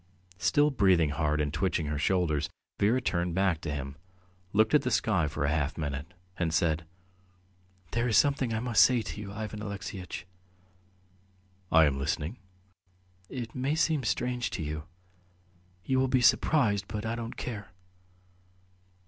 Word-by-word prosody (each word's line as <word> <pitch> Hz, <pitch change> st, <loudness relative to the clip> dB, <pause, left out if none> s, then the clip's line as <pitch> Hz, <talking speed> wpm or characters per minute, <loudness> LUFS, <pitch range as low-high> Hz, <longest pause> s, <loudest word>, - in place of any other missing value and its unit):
Still 145 Hz, +10 st, +3 dB
breathing 95 Hz, -, +3 dB
hard 75 Hz, 0 st, 0 dB
and 75 Hz, -1 st, -1 dB
twitching 85 Hz, -1 st, 0 dB
her 75 Hz, 0 st, -2 dB
shoulders, 80 Hz, -4 st, +1 dB, 0.3 s
Vera 110 Hz, +6 st, +3 dB
turned 85 Hz, -6 st, -1 dB
her -, -, -5 dB
back 95 Hz, -4 st, +1 dB
to 75 Hz, -, -3 dB
him, 70 Hz, 0 st, -5 dB, 0.5 s
looked 110 Hz, +2 st, +3 dB
at 150 Hz, -, +6 dB
the 125 Hz, -, -1 dB
sky 100 Hz, -8 st, +2 dB
for 75 Hz, 0 st, -2 dB
half 75 Hz, 0 st, 0 dB
a -, -, -6 dB
minute, 75 Hz, +2 st, -4 dB, 0.2 s
and 85 Hz, -2 st, 0 dB
said: 80 Hz, 0 st, +1 dB, 1.0 s
"There 115 Hz, +1 st, 0 dB
is 110 Hz, -, +3 dB
something 140 Hz, -4 st, +3 dB
I 110 Hz, 0 st, -1 dB
must 120 Hz, -3 st, +3 dB
say 125 Hz, -3 st, +3 dB
to 105 Hz, -, -6 dB
you, 100 Hz, -1 st, -7 dB
Ivan 105 Hz, 0 st, -5 dB
Alexeyitch... 100 Hz, -3 st, -6 dB, 0.7 s
." -, -, -36 dB, 0.7 s
"I 80 Hz, 0 st, +7 dB
am 70 Hz, -2 st, 0 dB
listening." 75 Hz, -, -2 dB, 0.9 s
"It 120 Hz, -4 st, -6 dB
may 135 Hz, +4 st, 0 dB
seem 160 Hz, -3 st, +1 dB
strange 125 Hz, +1 st, -1 dB
to 80 Hz, -, -3 dB
you.... 75 Hz, 0 st, -4 dB, 1.0 s
You 130 Hz, -1 st, +2 dB
will 130 Hz, -, +3 dB
be 130 Hz, 0 st, +2 dB
surprised, 110 Hz, -5 st, +3 dB
but 105 Hz, +1 st, -4 dB
I 110 Hz, -, -1 dB
don't 115 Hz, 0 st, -5 dB
care. 105 Hz, -5 st, -6 dB
100 Hz, 160 wpm, -29 LUFS, 80-120 Hz, 1.0 s, I